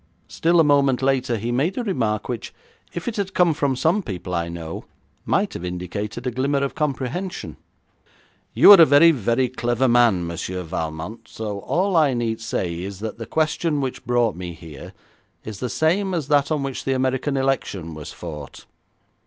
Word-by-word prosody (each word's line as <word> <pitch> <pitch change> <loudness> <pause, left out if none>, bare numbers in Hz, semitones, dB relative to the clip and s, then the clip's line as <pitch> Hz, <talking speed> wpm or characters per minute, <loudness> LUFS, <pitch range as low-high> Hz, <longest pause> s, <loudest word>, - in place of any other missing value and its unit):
Still 170 +1 +2
a - - +7
moment 140 -3 +3
later 130 -3 +1
he 115 +3 -3
made 145 +10 0
a 250 - -1
remark 110 - -1
which, 120 -3 -5 0.4
if 175 - -6
it 235 -1 -3
had 195 -1 -3
come 175 -3 +4
from 140 -3 0
some 165 +10 +2
people 95 - -6
I 85 -1 -1
know, 85 -1 -7 0.4
might - - +1
have - - -6
indicated 90 +6 -5
a 125 - 0
glimmer 140 +3 0
of 140 - -2
comprehension. 150 +5 -3 1.0
'You - - +9
are 195 -4 +10
a - - +10
very, 150 +4 +7
very 125 -1 +1
clever 120 +1 0
man, 120 -7 +4
Monsieur 90 +2 -4
Valmont, 80 +6 -5
so 105 -2 -5
all 185 - 0
I 150 -5 +4
need 115 -2 -2
say 90 -6 -3
is 95 0 -6
that 110 +1 -5
the 115 - -6
question 155 0 0
which 130 -1 -4
brought 120 -3 +1
me 90 -1 -6
here 80 -4 -11 0.5
is 110 -2 -7
the 125 - -3
same 185 - +1
as 155 -4 -3
that 145 0 +3
on 150 -3 0
which 135 -2 -4
the 135 - 0
American 130 +2 0
election 115 -11 -1
was 75 -1 -8
fought. 75 -5 -9
125 Hz, 185 wpm, -22 LUFS, 100-150 Hz, 1.0 s, are